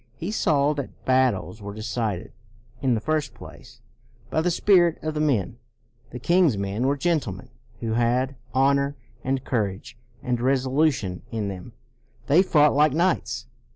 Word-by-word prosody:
He 170 - -5
saw 150 -8 +2
that 140 -3 -7
battles 130 -4 +1
were 100 0 -7
decided, 110 -3 -3 0.5
in 130 -4 +2
the - - 0
first 155 +5 -2
place, 115 -1 -13 0.5
by 160 - +1
the 180 - +1
spirit 175 -1 +4
of 155 0 -2
the 150 - -3
men. 120 -7 0 0.5
The 125 - -7
king's 170 - +3
men 100 +6 -1
were 140 +1 +1
gentlemen, 135 - -1 0.3
who 115 - -2
had 125 +3 +1
" - - -31
honor 140 +2 +2 0.3
and 135 0 -1
courage 105 -3 -2 0.3
and 125 -2 -1
resolution 130 - +1
in 110 -3 -2
them"; 95 +4 -8 0.5
they 155 +6 +5
fought 150 -5 +4
like 150 0 +4
knights. 155 -8 0
130 Hz, 155 wpm, -24 LUFS, 115-150 Hz, 0.5 s, they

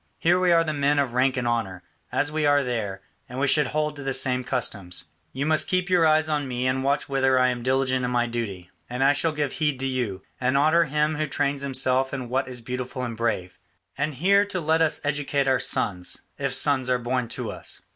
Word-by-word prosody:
Here 175 +2 +3
we 180 -1 +3
are 165 -1 +5
the 155 -1 -2
men 145 0 +1
of 135 -4 0
rank 130 +1 +2
and 120 -2 -1
honour, 100 -6 -2 0.3
as 145 - 0
we 155 0 -1
are 145 -1 +4
there, 105 -6 -3 0.3
and 125 +1 -6
we 140 - +1
should 150 0 +3
hold 150 +1 -1
to 140 - -7
the 135 -1 +1
same 125 -1 +2
customs. 105 -8 -3 0.3
You 135 +2 -3
must 155 0 +2
keep 185 0 0
your 170 -3 +5
eyes 155 0 +3
on 150 -3 -1
me 125 0 -2
and 130 +1 0
watch 140 +1 0
whether 135 -1 +2
I 130 0 +4
am 125 -1 -3
diligent 130 0 +1
in 125 - 0
my 120 -1 +1
duty, 105 -7 -5 0.2
and 125 +2 -1
I 140 +1 +5
shall 160 +3 +1
give 150 -3 -2
heed 150 -4 -1
to 135 - -2
you, 120 -8 -2 0.2
and 130 +2 +1
honour 160 +4 +4
him 150 +1 0
who 155 0 -1
trains 140 -1 -1
himself 130 0 +1
in 125 -3 -6
what 130 +2 0
is 125 -2 -5
beautiful 125 +2 -5
and 120 -2 -4
brave. 95 -6 -2 0.4
And 145 +1 -2
here 200 +8 +4
too 200 -2 -3
let 160 0 +1
us 155 -1 +2
educate 145 -1 0
our 130 -1 +3
sons, 90 -8 -2 0.2
if - - 0
sons 130 -3 +3
are 125 - +3
born 125 0 -2
to - - -4
us. - - -6
135 Hz, 235 wpm, -25 LUFS, 125-150 Hz, 0.4 s, are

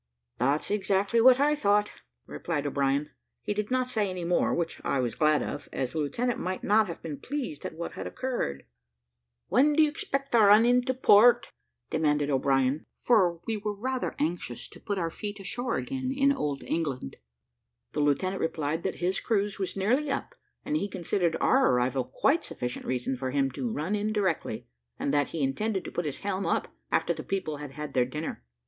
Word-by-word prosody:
"That's 140 - +1
exactly 200 +2 +2
what 255 +2 +7
I 295 +1 +4
thought," 210 -5 +2 0.3
replied 145 - -3
O'Brien. 140 +1 0 0.3
He - - -1
did 210 0 -2
not 255 0 +1
say 215 -5 0
any 185 -1 -4
more, 175 +1 +2
which 170 -1 -2
I - - 0
was 120 -4 0
glad 155 +2 +3
of, 145 - -6
as 130 -2 -2
the 160 - -2
lieutenant 230 - -1
might 185 +1 -3
not 215 +1 +4
have 170 - -7
been 150 -4 -5
pleased 265 - -4
at - - -10
what 170 +1 -5
had - - -6
occurred. 245 - -3 0.8
"When 290 +4 +4
do 315 - +6
you 305 - +3
expect 275 -5 -3
to 235 - +5
run 210 +2 +7
into 250 +1 +3
port?" 240 -1 +6 0.4
demanded 150 -2 +1
O'Brien; 135 +1 +1
for 180 -8 +2
we 225 -1 -1
were 210 0 -3
rather 255 +4 -2
anxious 155 -6 -3
to - - -14
put 205 - -3
our 165 -3 -1
feet 205 +3 -6
ashore 235 +5 -3
again 260 -1 -3
in 275 +1 +3
old 145 - -3
England. 140 - -3 0.7
The - - -3
lieutenant 165 +7 +1
replied 160 0 -1
that 190 - -2
his 185 +1 +1
cruise 205 -3 -1
was 190 0 -3
nearly 250 +10 +1
up; 275 - -3 0.3
and 295 - -1
he 255 - 0
considered 175 -2 0
our 265 +1 +4
arrival 125 +1 +1
quite 280 - +1
sufficient 125 0 -5
reason 130 +1 -1
for 130 +1 -3
him 135 0 +1
to 240 - -3
run 180 0 -2
in 210 +1 -1
directly, 205 -3 -1 0.3
and 140 - -1
that 145 -1 +2
he 160 -4 -3
intended 190 +8 -1
to - - -6
put 175 - -2
his 145 - -3
helm 195 -1 -1
up - - 0 0.2
after - - +2
the - - -6
people 185 -6 -3
had 145 -2 -8
had 150 -1 -6
their 125 -2 +3
dinner. 150 - -5
185 Hz, 195 wpm, -28 LUFS, 145-230 Hz, 0.8 s, what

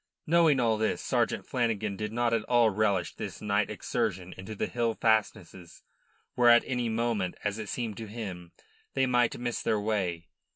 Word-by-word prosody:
Knowing 160 -4 +4
all 115 -3 +2
this, 110 - 0
Sergeant - - 0
Flanagan 110 -5 -1
did 105 +2 -4
not 120 0 0
at 115 - +2
all 120 -3 +4
relish 100 -3 0
this - - -7
night 105 0 0
excursion 105 -4 -2
into 95 +3 -8
the - - -1
hill 115 -2 -1
fastnesses, 105 -5 -1 0.5
where 120 -1 +5
at 120 0 +7
any 125 -2 -1
moment, 110 -5 -1
as 105 +1 -2
it 105 -3 -6
seemed 115 -4 -3
to 110 - -6
him, 95 -6 -7 0.4
they 135 -1 +3
might 125 -2 +2
miss 120 -1 -3
their 110 - +1
way. 95 -6 -2
110 Hz, 175 wpm, -29 LUFS, 100-120 Hz, 0.5 s, at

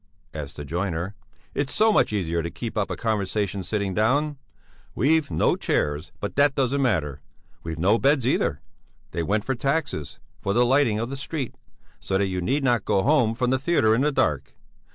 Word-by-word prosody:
asked 75 -2 -6
the 75 - -7
joiner. 85 +3 -2 0.4
"It's 145 -1 -2
so 220 0 +4
much - - +3
easier 85 -5 -1
to 85 - -4
keep 115 +5 -6
up 105 -2 0
a - - -2
conversation 100 -2 -1
sitting 100 0 -2
down. 140 +8 +1 0.6
We've 150 +4 +2
no - - +2
chairs, 75 +3 -1
but 100 -3 -4
that 145 -1 +4
doesn't 135 +1 +1
matter; 75 - 0 0.4
we've 80 -1 -5
no 100 +8 +3
beds 140 -2 +3
either; 125 - +1 0.5
they 85 - -2
went 105 +6 0
for 135 - 0
taxes, 135 - -2 0.2
for 100 - -1
the 120 +2 +4
lighting 130 -4 +3
of 115 +3 -3
the 135 - -4
street, 135 -2 -4 0.5
so 95 - -1
that 100 - +2
you 95 -1 -2
need 135 +10 0
not 120 -5 +2
go 95 - +1
home 120 -5 +3
from 125 +1 0
the 130 - +2
theatre 135 -7 +3
in 115 - +2
the 150 +2 +2
dark. 75 - 0
110 Hz, 195 wpm, -24 LUFS, 95-135 Hz, 0.6 s, so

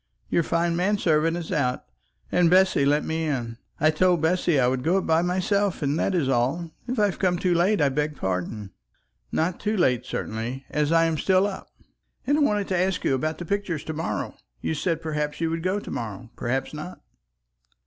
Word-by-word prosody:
Your - - +3
fine 170 +1 0
man 195 +4 +1
servant 165 -2 +2
is 170 -2 -6
out, 130 -5 0 0.5
and 175 -2 +4
Bessy 185 -5 +4
let 145 +2 +2
me 160 0 -1
in. 120 -6 -3 0.2
I 155 +2 +4
told 175 +2 +3
Bessy 165 -1 +2
I 125 - +4
would 125 +1 +1
go 175 +4 +2
up 190 - -1
by 160 0 +3
myself, 190 +1 0
and 145 +3 0
that 195 - +1
is 160 -7 +1
all. 135 +7 0 0.2
If 250 +1 -2
I 210 - +4
have 195 - -2
come 180 -3 +2
too 180 0 +1
late 185 +5 +2
I 145 - +4
beg 150 +2 -1
pardon." 95 0 -3 0.6
"Not 170 +3 0
too 215 0 -1
late, 130 -10 +2
certainly, 120 +5 -4
as 150 0 +1
I 165 0 +5
am 160 -2 0
still 190 0 +3
up." 200 -2 -5 0.6
"And 285 +4 +2
I - - +2
wanted 210 -8 +2
to 185 - +1
ask 185 0 0
you - - +2
about 155 +4 -1
the 175 - -6
pictures 190 -5 -2
to 160 - -5
morrow? 160 +1 -3 0.3
You - - -2
said, 165 +1 -1
perhaps 150 -1 -2
you 165 -1 0
would 165 0 -2
go 185 +4 0
to - - -9
morrow, 115 +1 -6
perhaps 130 +4 -2
not." 155 +5 -8
165 Hz, 210 wpm, -25 LUFS, 145-185 Hz, 0.6 s, I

